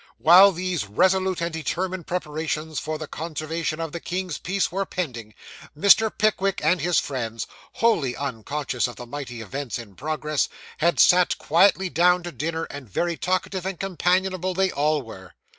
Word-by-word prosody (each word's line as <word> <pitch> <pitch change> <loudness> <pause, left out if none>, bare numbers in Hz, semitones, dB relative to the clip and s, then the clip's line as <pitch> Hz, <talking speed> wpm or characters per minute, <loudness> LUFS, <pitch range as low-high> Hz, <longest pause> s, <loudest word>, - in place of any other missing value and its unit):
While 185 +5 +8
these 180 - -3
resolute 185 - +2
and 170 0 -2
determined 180 +2 -3
preparations 155 -2 -3
for 155 +1 -4
the 155 - -6
conservation 155 +1 -4
of 165 -2 -3
the 170 - -5
king's 180 0 -4
peace 195 +1 -1
were 195 +2 -1
pending, 120 - -5 0.4
Mr. 200 +6 +6
Pickwick 200 -2 +1
and 180 0 +2
his 175 -1 +1
friends, 115 -5 -2 0.3
wholly 165 - +1
unconscious 135 0 -2
of 120 - -9
the 120 - -9
mighty 120 -2 -7
events 130 +5 -4
in 115 -5 -10
progress, 150 +4 -2 0.3
had 170 +2 +2
sat 180 0 +5
quietly 190 +3 +3
down 180 +1 +3
to 175 - -5
dinner; 160 +5 -3
and 140 -7 -8
very 170 - -1
talkative 185 +1 -2
and 190 -2 -4
companionable 185 0 0
they 190 0 +2
all 150 0 +1
were. 95 -5 -12
165 Hz, 160 wpm, -24 LUFS, 145-185 Hz, 0.4 s, While